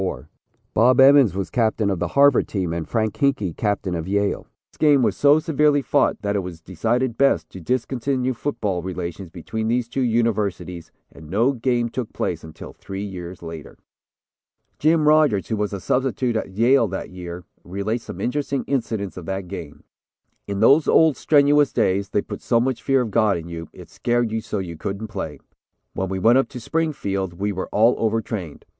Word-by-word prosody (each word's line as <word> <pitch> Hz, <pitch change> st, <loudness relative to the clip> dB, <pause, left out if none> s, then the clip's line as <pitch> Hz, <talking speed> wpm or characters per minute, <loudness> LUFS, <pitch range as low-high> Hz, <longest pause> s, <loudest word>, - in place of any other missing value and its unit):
Bob 125 Hz, +4 st, +4 dB
Emmons 135 Hz, -, +6 dB
was 95 Hz, -1 st, -3 dB
captain 110 Hz, -3 st, +1 dB
of 95 Hz, -, -2 dB
the 90 Hz, -, -1 dB
Harvard 140 Hz, -2 st, +5 dB
team 90 Hz, -5 st, -2 dB
and 85 Hz, -2 st, -4 dB
Frank 110 Hz, -3 st, 0 dB
Hinkey 135 Hz, -, 0 dB
captain 100 Hz, -3 st, -1 dB
of 85 Hz, -1 st, -3 dB
Yale. 100 Hz, +1 st, -1 dB, 0.2 s
This -, -, -24 dB
game 145 Hz, -4 st, +4 dB
was -, -, +1 dB
so 145 Hz, +1 st, +5 dB
severely 150 Hz, -2 st, +2 dB
fought 140 Hz, -5 st, +1 dB
that 100 Hz, 0 st, -1 dB
it -, -, +2 dB
was 90 Hz, -3 st, -7 dB
decided 115 Hz, +8 st, -1 dB
best 85 Hz, -13 st, +2 dB
to 95 Hz, -, -9 dB
discontinue 130 Hz, -, -1 dB
football 105 Hz, -8 st, -2 dB
relations 90 Hz, 0 st, -5 dB
between 110 Hz, +6 st, -5 dB
these 120 Hz, +1 st, 0 dB
two 135 Hz, -, -3 dB
universities 105 Hz, -7 st, -1 dB, 0.2 s
and 80 Hz, -1 st, -13 dB
no 115 Hz, +9 st, +2 dB
game 120 Hz, -2 st, 0 dB
took 120 Hz, -1 st, -5 dB
place -, -, -3 dB
until 80 Hz, -1 st, -10 dB
three 95 Hz, +2 st, -7 dB
years 90 Hz, -3 st, -7 dB
later. 80 Hz, -2 st, -9 dB, 1.0 s
Jim 155 Hz, 0 st, +3 dB
Rodgers, 150 Hz, -10 st, +3 dB
who 110 Hz, -, 0 dB
was 105 Hz, -1 st, -2 dB
a 100 Hz, -, -4 dB
substitute 125 Hz, +2 st, 0 dB
at 110 Hz, -, -2 dB
Yale 115 Hz, +5 st, +3 dB
that 95 Hz, -1 st, -6 dB
year, 90 Hz, -1 st, -8 dB, 0.2 s
relates 100 Hz, +6 st, -3 dB
some -, -, -8 dB
interesting 140 Hz, +1 st, -2 dB
incidents 110 Hz, -8 st, -2 dB
of 85 Hz, -3 st, -8 dB
that 95 Hz, -1 st, -4 dB
game: 85 Hz, -5 st, -8 dB, 0.6 s
"In 100 Hz, 0 st, -3 dB
those 140 Hz, +7 st, +5 dB
old 160 Hz, -3 st, +5 dB
strenuous 145 Hz, -1 st, +4 dB
days, 100 Hz, +2 st, 0 dB
they 100 Hz, -, 0 dB
put -, -, -7 dB
so 115 Hz, -, +2 dB
much 125 Hz, -1 st, -1 dB
fear 135 Hz, -1 st, +2 dB
of 115 Hz, -4 st, -3 dB
God 110 Hz, -3 st, +3 dB
in 85 Hz, 0 st, -8 dB
you, 85 Hz, -2 st, -7 dB
it -, -, -13 dB
scared 120 Hz, -1 st, -1 dB
you 110 Hz, 0 st, -2 dB
so 105 Hz, -, -4 dB
you 85 Hz, -4 st, -5 dB
couldn't 100 Hz, +6 st, -5 dB
play. 95 Hz, -7 st, -5 dB, 0.5 s
When 95 Hz, -1 st, -3 dB
we 95 Hz, -, -2 dB
went 115 Hz, +7 st, +5 dB
up 135 Hz, -, +1 dB
to 125 Hz, -, -8 dB
Springfield, 105 Hz, -, -2 dB
we 100 Hz, +4 st, -2 dB
were 95 Hz, -1 st, -4 dB
all 115 Hz, +4 st, +4 dB
over 115 Hz, 0 st, +1 dB
trained. 95 Hz, -10 st, -6 dB
110 Hz, 190 wpm, -22 LUFS, 95-130 Hz, 1.0 s, Emmons